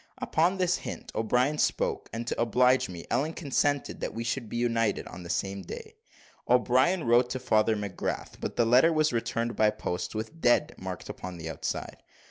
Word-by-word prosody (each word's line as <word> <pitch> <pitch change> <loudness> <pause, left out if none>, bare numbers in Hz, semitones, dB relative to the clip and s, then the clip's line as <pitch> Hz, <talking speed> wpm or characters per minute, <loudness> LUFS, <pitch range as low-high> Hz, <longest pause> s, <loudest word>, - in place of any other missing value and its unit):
Upon 175 +4 +1
this 180 -1 +2
hint - - -7
O'Brien 125 +7 +1
spake; - - 0
and 115 +2 -4
to 115 - -2
oblige 125 +2 +3
me, 85 -2 -8
Ellen 140 +7 +1
consented 145 -2 0
that - - -4
we 115 - -3
should 115 -1 -3
be 120 - -4
united 115 -3 +1
on 90 - -9
the 85 - -9
same 95 +2 -2
day. 90 - -8 0.6
O'Brien 130 +8 +3
wrote 120 +1 +4
to 130 - -3
Father 110 -1 +2
McGrath; 100 -3 -4
but - - -4
the 120 - +3
letter 125 +8 +5
was 155 -3 +2
returned 115 0 -1
by 110 -1 +4
post, 100 -3 -4
with 110 +10 -5
"dead" 120 - +3
marked - - -6
upon 90 -1 -7
the 80 -1 -5
outside. - - -4
120 Hz, 185 wpm, -28 LUFS, 110-135 Hz, 0.6 s, letter